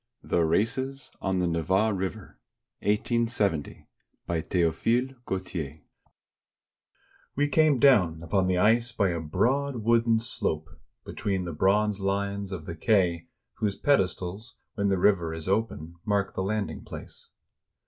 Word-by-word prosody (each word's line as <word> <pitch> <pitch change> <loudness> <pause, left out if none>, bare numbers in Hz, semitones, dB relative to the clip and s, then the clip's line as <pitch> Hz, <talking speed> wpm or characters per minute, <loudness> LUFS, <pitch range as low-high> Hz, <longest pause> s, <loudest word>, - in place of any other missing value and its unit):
THE 85 - +1
RACES 130 - -1
ON 95 -1 0
THE 90 - +1
NEVA 95 +6 +1
RIVERA 95 +2 -4 0.5
BY 105 - -2
THEOPHILE 115 +10 +1
GAUTIER 85 -6 -4 1.5
We 145 +2 +2
came 155 -1 +4
down 90 - +4
upon 95 +3 +1
the 90 -1 +1
ice 115 +5 +3
by 100 -3 +1
a 85 -1 -2
broad 125 - 0
wooden 115 0 +3
slope, 80 -9 -2 0.4
between 100 -3 -2
the 85 - -4
bronze 100 +5 +2
lions 100 0 -2
of 85 -5 -6
the 85 - -6
quay, 90 -3 +1 0.3
whose 105 -2 -1
pedestals, 100 -3 0 0.2
when 100 -1 0
the 95 - +2
river 85 -4 +2
is 80 0 -7
open, 95 -5 -1
mark 100 -1 0
the - - -2
landing 105 +1 -2
place. - - -10
100 Hz, 130 wpm, -27 LUFS, 85-115 Hz, 1.5 s, came